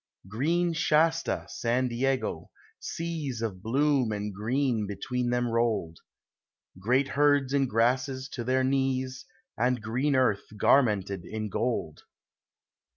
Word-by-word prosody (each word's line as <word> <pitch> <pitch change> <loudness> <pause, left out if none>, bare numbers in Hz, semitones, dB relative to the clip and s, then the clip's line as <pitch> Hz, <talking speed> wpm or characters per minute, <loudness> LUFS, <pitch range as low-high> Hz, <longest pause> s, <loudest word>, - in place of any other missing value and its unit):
Green 165 - 0
Shasta, 160 +1 +1
San 125 +2 0
Diego, 130 +2 -1 0.3
seas 155 -8 -4
Of 95 -5 -4
bloom 135 +1 +1
and 105 0 -3
green 115 +1 0
between 120 +5 -2
them 120 0 +1
rolled. 115 -8 0 0.8
Great 125 +8 +1
herds 145 -2 +2
in 135 -1 +2
grasses 130 +4 0
to 120 - -5
their 130 +2 +1
knees, 130 -1 -1 0.3
And 125 0 +2
green 125 +6 0
earth 125 -6 +2
garmented 100 -7 +2
in 110 +4 -5
gold. 105 -8 -2
125 Hz, 115 wpm, -28 LUFS, 110-135 Hz, 0.8 s, herds